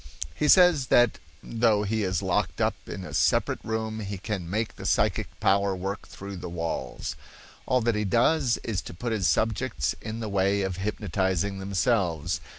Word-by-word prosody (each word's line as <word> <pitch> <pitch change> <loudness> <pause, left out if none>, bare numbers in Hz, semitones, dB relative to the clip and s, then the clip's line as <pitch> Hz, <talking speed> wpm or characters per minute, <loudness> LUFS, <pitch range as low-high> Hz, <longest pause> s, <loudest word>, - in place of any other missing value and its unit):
He 150 - 0
says 175 -7 +6
that 120 -2 +4 0.2
though 110 -3 +2
he 110 +2 -1
is 95 0 -1
locked 95 -2 0
up - - +2 0.2
in 95 - -5
a 75 - -8
separate 75 -4 +1
room 110 0 -3
he 100 -2 -4
can 95 -3 -4
make 110 +4 -2
the - - -9
psychic - - +1
power 100 -1 +2
work 95 +2 -5
through 100 0 -8
the 90 0 -6
walls. 85 -7 -4 0.5
All 130 0 +2
that 115 +1 +2
he 105 0 -1
does 120 - +2
is 105 -6 -2
to - - -9
put 120 +6 -3
his 100 -6 +1
subjects 110 - 0
in 110 +1 -5
the 110 - -3
way 100 0 +1
of 95 -2 -3
hypnotizing 95 -1 -1
themselves. 95 -4 0
100 Hz, 175 wpm, -27 LUFS, 95-110 Hz, 0.5 s, says